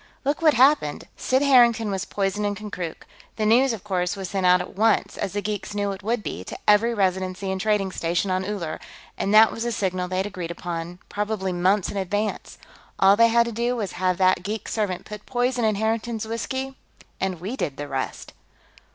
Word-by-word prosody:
"Look 285 +3 0
what 310 -2 +5
happened. 260 - +3
Sid 260 +2 +1
Harrington 235 -6 +5
was 195 0 -2
poisoned 200 +1 -1
in 205 0 0
Konkrook. 200 -5 -6 0.3
The 215 - -1
news, 245 +5 +4
of 220 -5 -5
course, 185 -2 -1
was 190 -2 -5
sent 190 -2 +1
out 180 0 +6
at 180 - -7
once, 220 +2 +2
as 195 - -3
the 205 0 -2
geeks 210 0 -4
knew 205 -1 0
it 195 0 -7
would 220 +2 -1
be, 90 - -5
to - - -7
every 210 +3 +5
residency 190 -2 -1
and 190 0 -2
trading 210 -3 +1
station 175 +3 -1
on 185 0 0
Uller, 185 -6 -4 0.4
and 195 - -1
that 220 +1 +7
was 225 - -7
the 240 +1 -1
signal 185 -4 -1
they'd 185 +1 -1
agreed 185 -5 -5
upon, 170 0 -5
probably 205 -2 -2
months 185 +3 +1
in 205 - -5
advance. 205 +3 -2 0.4
All 195 +1 +6
they 230 +2 +6
had 235 0 +4
to 235 - -4
do 235 +2 -1
was 210 -5 -3
have 185 -1 0
that 185 -1 +3
geek 210 +4 -4
servant 205 -5 -2
put 210 -1 -9
poison 245 -1 0
in 215 -1 +2
Harrington's 220 +1 -1
whiskey, 265 +4 -4 0.4
and 185 -3 -2
we 200 +9 -4
did 145 - -3
the 145 - -5
rest." 135 -1 -4
205 Hz, 205 wpm, -24 LUFS, 185-225 Hz, 0.4 s, that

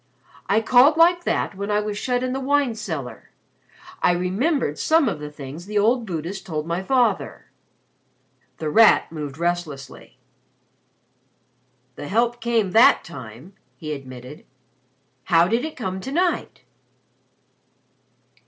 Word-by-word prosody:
I 215 +3 +3
called 255 +7 +5
like 345 +1 +4
that - - -1
when 200 +1 -5
I 210 0 +2
was 210 0 -3
shut 245 +3 -1
in 255 0 -2
the 265 - -2
wine 280 -2 +1
cellar. 140 - -6 0.7
I 180 - +4
remembered 185 - -1
some 320 -3 +3
of 190 -9 -2
the 150 0 -7
things 150 +4 -10
the 210 0 -2
old 225 +3 +2
Buddhist 175 +3 -5
told 155 -4 -4
my 170 +2 -2
father." 235 -1 0 1.1
The 155 0 -3
Rat 225 -3 +5
moved 150 -3 -6
restlessly. 165 -7 -4 1.8
"The 145 - -7
help 235 +3 0
came 225 -5 0
that 225 +5 +6
time," 135 - -11 0.2
he 155 -2 -5
admitted. 130 0 -10 0.8
"How 170 -1 +4
did 230 +6 0
it 315 0 -6
come 190 -5 -4
to 265 - -6
night?" 350 +4 -1
195 Hz, 135 wpm, -22 LUFS, 155-245 Hz, 1.8 s, that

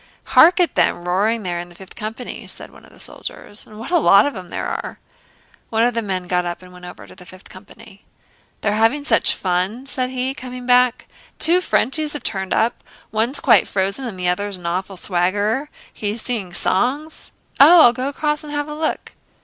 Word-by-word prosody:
"Hark 345 +4 +7
at 355 - +2
them 175 - +1
roaring 210 +5 +1
there 175 -2 -3
in 175 0 -7
the 175 - -16
Fifth 190 +1 -13
Company!" 220 +3 -7
said - - -10
one - - -17
of - - -19
the - - -19
soldiers, 205 - -9
"and 215 - -13
what 225 +9 -8
a 350 - +4
lot 200 -8 +6
of 285 - -2
them 185 -3 -8
there - - -4
are!" - - -5 0.7
One 225 0 +1
of 245 +1 +2
the 230 - -1
men 190 -4 -3
got 180 0 0
up 175 0 -5
and 180 0 -14
went 180 0 -12
over 180 - -11
to - - -15
the - - -14
Fifth 185 +1 -15
Company. 200 +2 -15 0.6
"They're 205 - 0
having 225 +7 +2
such 225 -5 +2
fun," 190 +7 -2
said 255 -2 -2
he, 260 +1 -2
coming 255 -2 -8
back. 250 -1 +3 0.3
"Two 350 +3 +4
Frenchies 300 -1 0
have 295 - -6
turned 190 -3 -3
up. 230 - 0 0.3
One's 225 +6 0
quite - - +4
frozen 200 +7 -2
and 195 -5 -7
the 180 - -1
other's 200 +2 -1
an 175 - -13
awful 185 +3 -3
swaggerer. 205 +10 -1 0.2
He's 210 +2 -4
singing 210 -7 -3
songs...." 260 - -1 0.3
"Oh, 320 +5 +9
I'll 240 - +7
go 255 +2 -3
across 300 +1 -2
and 300 - -9
have 290 0 -2
a 300 - -6
look...." 310 +1 -3
220 Hz, 210 wpm, -20 LUFS, 185-265 Hz, 0.7 s, Oh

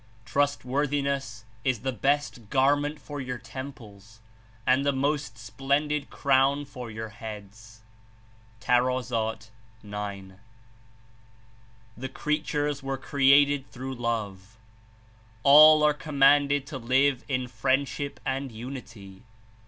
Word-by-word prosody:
Trustworthiness 140 -2 -1 0.2
is 130 -5 0
the 130 +2 -1
best 130 -2 -1
garment 145 +3 +2
for 145 0 -7
your 125 -1 -4
tem 130 +4 -7
ples 110 -3 -16 0.5
and 130 +2 +3
the 140 - +2
most 140 -3 -1
splendid 140 +6 -1
crown 140 +1 +2
for 125 -4 -9
your 110 0 -6
heads." 110 +1 -10 0.8
(Tar. 125 +1 +2
g.) 110 -4 -6 1.6
"The 130 +2 -6
creatures 150 -1 -2
were 135 0 -3
created 140 +1 +3
through 130 +1 -6
love; 110 -4 -4 0.9
all 155 +2 +8
are 150 0 +5
commanded 145 -1 +3
to 140 -2 -7
live 130 +2 +2
In 130 -2 -1
friendship 135 +2 -1
and 135 0 -2
unity. 110 -5 -9
130 Hz, 105 wpm, -27 LUFS, 115-140 Hz, 1.6 s, all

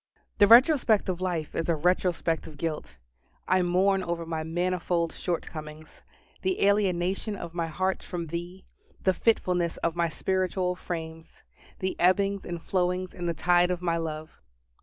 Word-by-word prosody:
The 205 - +7
retrospect 235 -3 +6
of 180 -1 -2
life 175 -4 -2
is 165 0 -2
a 165 - +3
retrospect 175 0 0
of 155 -2 -12
guilt. 155 +1 -4 0.5
I 185 0 +3
mourn 190 +2 +2
over 170 -2 -3
my 160 -1 -3
manifold 170 0 -1
shortcomings 155 -3 -6 0.4
the 375 - +1
alienation 195 0 +1
of 170 -3 -7
my 170 -1 -2
heart 185 +4 -1
from 175 -2 -5
Thee 175 +3 -6 0.4
the 190 - +3
fitfulness 180 -5 +1
of 170 -1 0
my 170 -1 +1
spiritual 185 +1 -1
frames 165 -2 -7 0.3
the 190 0 -2
ebbings 195 +2 +2
and 175 -1 -4
flowings 180 +1 -1
in 175 -1 -4
the 170 - -1
tide 175 +2 +3
of 180 -1 -2
my 170 -1 +1
love. 155 -1 -6
175 Hz, 155 wpm, -27 LUFS, 165-185 Hz, 0.5 s, The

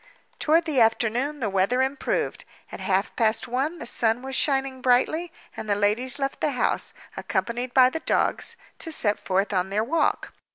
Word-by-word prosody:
Toward 325 +2 +3
the 285 -6 +1
afternoon 240 +6 +1
the 220 - 0
weather 195 +7 +2
improved. 270 +2 -2 0.3
At - - -7
half 195 0 0
past 220 0 +1
one 270 +8 -1
the 235 - -7
sun 235 +1 +1
was 265 0 -4
shining 270 -2 +1
brightly; 285 +7 +2 0.2
and 215 - -7
the 205 - +3
ladies 210 +6 +1
left 275 -1 -3
the 295 - +1
house, 250 - 0 0.2
accompanied 245 +1 -2
by 255 -1 +6
the 320 - -3
dogs, - - 0 0.2
to 325 - -5
set 210 -9 +1
forth 195 +2 -1
on 185 0 0
their 210 +2 0
walk. 300 +5 0
250 Hz, 175 wpm, -25 LUFS, 220-275 Hz, 0.3 s, by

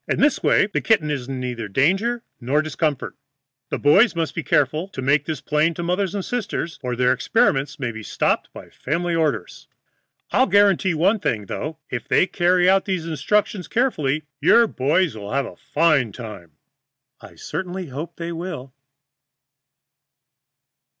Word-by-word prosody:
In - - -1
this 290 - +3
way - - +4
the 205 - -2
kitten 160 -10 +2
is 135 -4 -3
in 135 -1 -4
neither 120 -3 -4
danger 195 - +1 0.2
nor 135 +5 +1
discomfort. 155 -2 -2 0.5
The - - -2
boys 190 +10 +4
must 165 -1 -2
be 165 - -3
careful 155 +4 +1
to 195 - -10
make 140 +2 +2
this 155 -4 -4
plain 155 +2 +1
to 175 - -4
mothers 185 +3 -1
and 195 - -3
sisters, 205 -8 -3
or 125 -2 -3
their 125 +1 +3
experiments 135 +2 +1
may 125 -4 -3
be 110 0 -8
stopped - - -1
by - - -12
family 170 +5 -2
orders. 150 - -2 0.6
I'll - - +3
guarantee 195 -2 +3
one 195 +8 +2
thing, 110 - -1
though, 155 +10 -5
if 120 -2 -4
they - - +4
carry 180 -1 +2
out 190 +1 +4
these 185 -4 -2
instructions 185 +5 0
carefully, 155 - 0 0.2
your 230 +10 +5
boy 150 - +1
friends 175 -10 -1
will 105 0 -7
have 140 0 +1
a - - -9
fine 150 -7 +1
time." 105 -9 -9 0.7
I - - -14
certainly 180 +1 -5
hope 145 +6 -6
they 170 0 -5
will. 165 -7 -6
155 Hz, 165 wpm, -22 LUFS, 135-185 Hz, 0.7 s, your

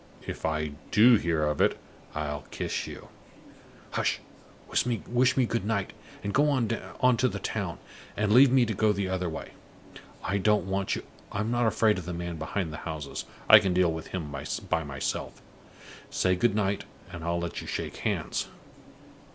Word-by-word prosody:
If - - -3
I 75 -1 -1 0.2
do 115 +4 +7
hear 85 -4 +1
of 75 0 0
it, - - +3 0.4
I'll 75 -2 -3
kiss - - -3
you! - - -9 0.8
Hush! - - 0 0.5
Wish 125 +2 +1
me 130 - +4
good 115 -3 -1
night, 100 -2 -1 0.3
and 100 - -2
go 150 +1 +4
on 130 -5 +2
to 125 +2 +1
the - - -3
town, 95 -7 -3 0.4
and 105 0 +1
leave 130 +2 +8
me 130 -2 +5
to 110 - -2
go 105 +1 +3
the 100 -1 -1
other 90 -1 -1
way. 80 - -6 0.7
I 100 +2 0
don't 105 -2 +3
want 95 0 0
you - - -5 0.3
I'm 105 +3 -1
not 120 -1 +2
afraid 110 -2 +3
of 90 - -8
the 90 -1 -4
man 85 -1 -4
behind 80 +1 -3
the - - -5
houses; 80 -3 -5 0.2
I - - +11
can 95 -2 0
deal 90 -2 +4
with 80 0 -6
him 80 -6 -4 0.4
by 80 - +2
myself. 70 -1 -4 0.7
Say 90 0 +2
goodnight, 100 -1 +1 0.3
and 85 -3 -7
I'll 85 +1 0
let 85 -1 -4
you - - -9
shake - - -4
hands. - - -1
95 Hz, 175 wpm, -28 LUFS, 85-115 Hz, 0.8 s, I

